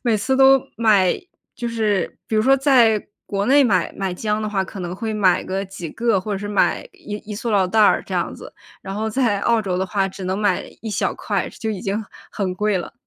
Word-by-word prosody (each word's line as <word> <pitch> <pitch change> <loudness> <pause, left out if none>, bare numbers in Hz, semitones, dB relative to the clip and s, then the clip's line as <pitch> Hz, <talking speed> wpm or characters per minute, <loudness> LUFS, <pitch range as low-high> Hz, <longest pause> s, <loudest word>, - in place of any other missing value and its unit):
每 235 -3 +2
次 260 +6 0
都 270 0 +6
买， 210 -5 +4 0.4
就 240 - -4
是 215 -5 -1
比 220 - 0
如 215 - +3
说 270 +2 +5
在 245 -6 +4 0.2
国 200 0 -2
内 280 +2 +5
买 215 -7 +1
买 190 -2 -2
姜 210 +3 -1
的 215 - -2
话， 195 -2 0
可 190 - -9
能 175 0 -4
会 220 +3 -4
买 195 -4 +3
个 190 +1 -3
几 185 -4 -8
个 230 -2 +1
或 210 +3 -6
者 195 - -2
是 205 - -5
买 205 - +1
一 350 - -8 0.2
一 - - -3
塑 230 +3 -3
料 200 -3 +3
袋 215 +4 +2
儿 - - +4
这 - - -5
样 - - -1
子， - - -11 0.3
然 195 - -6
后 220 +2 -2
在 225 -5 +1
澳 230 +1 +2
洲 190 -3 -2
的 185 - 0
话 195 0 0
只 190 0 -8
能 185 +2 -1
买 205 -3 +1 0.2
一 225 - -4
小 - - 0
块， - - -2
就 220 - -6
已 205 -4 -4
经 200 +3 -2 0.3
很 190 -3 -2
贵 210 0 0
了。 175 - -7
210 Hz, 255 characters per minute, -21 LUFS, 195-230 Hz, 0.4 s, 都